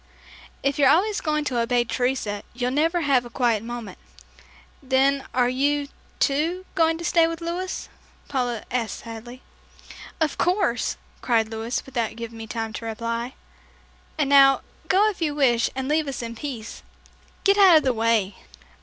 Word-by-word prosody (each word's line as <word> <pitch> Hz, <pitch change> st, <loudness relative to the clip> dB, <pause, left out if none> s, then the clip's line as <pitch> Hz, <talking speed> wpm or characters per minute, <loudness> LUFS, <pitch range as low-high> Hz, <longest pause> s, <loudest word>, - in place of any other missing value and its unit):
"If 275 Hz, +1 st, 0 dB
you're 275 Hz, -2 st, +6 dB
always 395 Hz, +8 st, +3 dB
going 305 Hz, -1 st, -1 dB
to 250 Hz, -4 st, -1 dB
obey 240 Hz, +1 st, +2 dB
Teresa, 240 Hz, -4 st, -1 dB
you'll 250 Hz, 0 st, -1 dB
never 325 Hz, +5 st, +1 dB
have 275 Hz, -5 st, +3 dB
a 240 Hz, -, -10 dB
quiet 235 Hz, -3 st, +1 dB
moment." 230 Hz, -4 st, -7 dB, 0.8 s
"Then 270 Hz, +1 st, +2 dB
are 250 Hz, -1 st, +2 dB
you, 285 Hz, +3 st, 0 dB, 0.3 s
too, 325 Hz, +6 st, 0 dB
going 325 Hz, -2 st, +2 dB
to 340 Hz, -, -6 dB
stay 335 Hz, -1 st, +4 dB
with 330 Hz, 0 st, -4 dB
Louis?" 350 Hz, +2 st, -4 dB, 0.4 s
Paula 245 Hz, -4 st, -2 dB
asked 230 Hz, -4 st, -2 dB
sadly. 235 Hz, +2 st, -9 dB, 0.8 s
"Of 315 Hz, -2 st, 0 dB
course," 355 Hz, -, +1 dB, 0.2 s
cried 225 Hz, -3 st, +1 dB
Louis, 225 Hz, +2 st, -3 dB
without 235 Hz, -5 st, -3 dB
giving 230 Hz, 0 st, -7 dB
me 225 Hz, -, -7 dB
time 225 Hz, 0 st, -4 dB
to 230 Hz, -, -6 dB
reply. 230 Hz, +2 st, -3 dB, 0.8 s
"And -, -, +1 dB
now, 275 Hz, -1 st, +7 dB, 0.3 s
go 395 Hz, +3 st, +4 dB
if 375 Hz, -, -14 dB
you 300 Hz, -3 st, 0 dB
wish 245 Hz, -5 st, +3 dB
and 265 Hz, 0 st, -3 dB
leave 305 Hz, +1 st, +1 dB
us 265 Hz, -3 st, -4 dB
in 230 Hz, 0 st, -6 dB
peace. 230 Hz, -3 st, -7 dB, 0.6 s
Get 400 Hz, +1 st, +4 dB
out 375 Hz, -5 st, +8 dB
of 310 Hz, -, +2 dB
the 260 Hz, -, +2 dB
way!" 220 Hz, -4 st, +1 dB
260 Hz, 165 wpm, -24 LUFS, 230-305 Hz, 0.8 s, out